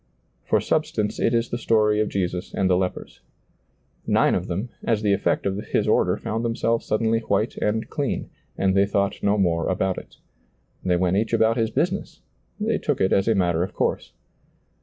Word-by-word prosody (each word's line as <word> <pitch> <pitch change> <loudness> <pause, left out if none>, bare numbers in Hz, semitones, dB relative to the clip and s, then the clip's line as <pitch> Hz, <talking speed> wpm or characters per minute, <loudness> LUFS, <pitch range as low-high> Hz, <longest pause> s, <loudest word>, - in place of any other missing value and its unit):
For - - +2
substance 150 -10 -1
it - - +2
is 115 0 +1
the 120 - -2
story 105 -2 +2
of 110 - +1
Jesus 90 -2 -3
and 95 - +1
the 90 - +3
lepers. 90 0 -3 0.9
Nine - - +3
of - - -1
them, 100 +8 -3
as 110 -2 0
the 100 -1 +3
effect 100 - 0
of 100 +1 -1
bis - - +2
order, - - +2
found 110 +2 -3
themselves 115 0 0
suddenly 110 +1 +1
white 110 0 -1
and 110 +2 -1
clean, 145 -2 -3 0.3
and 95 -1 +2
they 100 +1 +3
thought 100 -1 -1
no 100 +1 +2
more 85 -4 +1
about 95 0 0
it. - - -16 0.7
They 90 -1 +2
went 90 +1 +1
each 110 +2 -1
about 110 +1 +3
his 115 -2 0
business; - - -2 0.4
they - - 0
took - - -1
it 95 - +2
as 100 +1 +2
a 115 - +3
matter 85 -3 +1
of 90 - -3
course. - - -1
105 Hz, 190 wpm, -23 LUFS, 95-115 Hz, 0.9 s, the